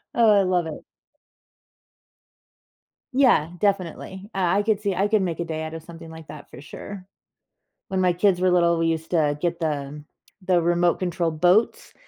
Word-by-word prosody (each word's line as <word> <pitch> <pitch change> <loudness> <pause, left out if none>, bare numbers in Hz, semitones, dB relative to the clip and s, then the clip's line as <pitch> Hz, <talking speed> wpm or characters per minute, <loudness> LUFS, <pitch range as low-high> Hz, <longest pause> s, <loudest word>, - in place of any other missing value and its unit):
Oh, 225 -3 +5
I 200 - +5
love 180 -2 +1
it. 160 -2 -7 2.3
Yeah, 250 - +3
definitely, 190 0 -2
uh - - -4 0.2
I - - +2
could 210 -1 0
see 200 -2 0
I 195 +3 +1
could 215 -2 +2
make 175 -3 -3
a - - -1
day 160 -1 -4
out 160 0 -6
of 165 - -7
something 165 0 -12
like 160 -1 -12
that 150 - -11
for 125 - -11
sure. 185 +6 -10 0.8
When 190 -1 -1
my 180 -1 +3
kids 180 +1 +1
were 185 0 +3
little, 170 -1 +3
we 165 0 +1
used 160 0 -3
to 150 -4 +1
get 170 -1 -1
the 150 -2 -4 0.4
the 180 -2 +2
remote 175 +1 +1
control 175 -2 -1
boats, 180 +8 +1
175 Hz, 180 wpm, -23 LUFS, 160-190 Hz, 2.3 s, Oh